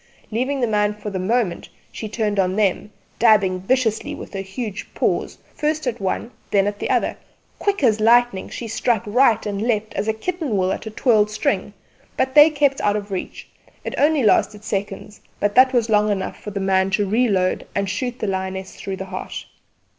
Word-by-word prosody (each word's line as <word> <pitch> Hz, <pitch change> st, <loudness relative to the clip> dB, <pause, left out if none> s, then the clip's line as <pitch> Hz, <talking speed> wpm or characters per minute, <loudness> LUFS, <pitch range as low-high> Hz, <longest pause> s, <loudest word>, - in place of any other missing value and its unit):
Leaving 260 Hz, +5 st, -1 dB
the -, -, +3 dB
man 210 Hz, -1 st, +1 dB
for 210 Hz, 0 st, -6 dB
the 190 Hz, -, -3 dB
moment, 205 Hz, -1 st, -1 dB, 0.2 s
she 215 Hz, -, -6 dB
turned 210 Hz, -2 st, -1 dB
on 185 Hz, 0 st, +1 dB
them, 205 Hz, -1 st, +1 dB, 0.3 s
dabbing 205 Hz, -5 st, +4 dB
viciously 220 Hz, +2 st, 0 dB
with -, -, -10 dB
her 195 Hz, -, -3 dB
huge 205 Hz, +2 st, -6 dB
paws, -, -, -1 dB, 0.2 s
first 305 Hz, 0 st, -1 dB
at 245 Hz, -2 st, -2 dB
one, 195 Hz, +5 st, -2 dB, 0.2 s
then 195 Hz, -1 st, +3 dB
at 205 Hz, 0 st, -3 dB
the -, -, -3 dB
other; -, -, +1 dB, 0.4 s
quick 400 Hz, -6 st, 0 dB
as 220 Hz, -4 st, +4 dB
lightning 235 Hz, -2 st, +3 dB
she 235 Hz, -, -6 dB
struck 225 Hz, 0 st, 0 dB
right 230 Hz, +1 st, +3 dB
and 205 Hz, -1 st, -3 dB
left 220 Hz, -2 st, -1 dB
as 210 Hz, -, -2 dB
a 220 Hz, -, +2 dB
kitten 300 Hz, -, -2 dB
will 185 Hz, 0 st, +1 dB
at -, -, -6 dB
a -, -, -3 dB
twirled 215 Hz, -1 st, +2 dB
string; 215 Hz, -, -1 dB, 0.5 s
but 265 Hz, -, 0 dB
they 295 Hz, +1 st, +8 dB
kept 285 Hz, -3 st, +1 dB
out 205 Hz, 0 st, +2 dB
of 205 Hz, -1 st, -4 dB
reach. 185 Hz, -, -5 dB, 0.4 s
It -, -, -4 dB
only 295 Hz, -2 st, +3 dB
lasted 210 Hz, 0 st, +2 dB
seconds, 200 Hz, 0 st, -4 dB, 0.2 s
but 205 Hz, 0 st, +1 dB
that 255 Hz, +2 st, +6 dB
was 240 Hz, -3 st, +2 dB
long 210 Hz, -1 st, +3 dB
enough 195 Hz, -2 st, -3 dB
for -, -, -6 dB
the 200 Hz, -1 st, -4 dB
man 190 Hz, 0 st, +2 dB
to 205 Hz, -2 st, 0 dB
reload 200 Hz, -4 st, +1 dB
and 200 Hz, 0 st, 0 dB
shoot 245 Hz, +6 st, -3 dB
the 225 Hz, -, -3 dB
lioness 190 Hz, -1 st, -3 dB
through 195 Hz, -, -5 dB
the 190 Hz, -, -5 dB
heart. 185 Hz, 0 st, -6 dB
210 Hz, 200 wpm, -21 LUFS, 195-245 Hz, 0.5 s, they